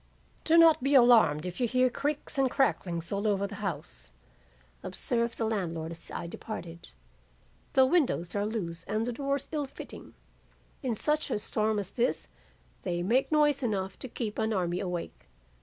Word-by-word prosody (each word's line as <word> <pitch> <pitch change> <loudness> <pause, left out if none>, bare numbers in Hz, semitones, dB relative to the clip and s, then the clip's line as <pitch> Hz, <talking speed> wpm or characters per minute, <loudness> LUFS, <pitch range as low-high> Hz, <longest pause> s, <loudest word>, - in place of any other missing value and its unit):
"'Do 330 +1 +5
not 330 -3 +7
be 275 +2 +2
alarmed 225 - +6
if 180 +7 -5
you 245 - +3
hear 255 +2 +3
creaks 285 +3 -2
and 265 -1 +3
cracklings 175 - 0
all 200 +2 0
over 200 -1 +1
the 200 - -7
house,' - - -5 0.7
observed 235 -1 -2
the 225 - 0
landlord 170 -7 -2
as 165 0 -10
I - - -5
departed. 170 -2 -8 0.8
'The 265 -1 +6
windows 260 - +1
are 205 - +1
loose 180 -6 -4
and 215 +2 -1
the 245 - -2
doors 275 +2 -2
ill 295 -3 -2
fitting. 265 - -10 0.7
In 250 -4 -1
such 300 +7 0
a - - 0
storm 215 0 -1
as 200 -2 -3
this 240 +3 0 0.5
they 175 -2 -2
make 245 - +2
noise 295 -2 +3
enough 195 -6 -2
to - - -5
keep 225 -3 -4
an 220 0 +1
army 180 -3 0
awake. 180 - -5
220 Hz, 170 wpm, -29 LUFS, 180-260 Hz, 0.8 s, not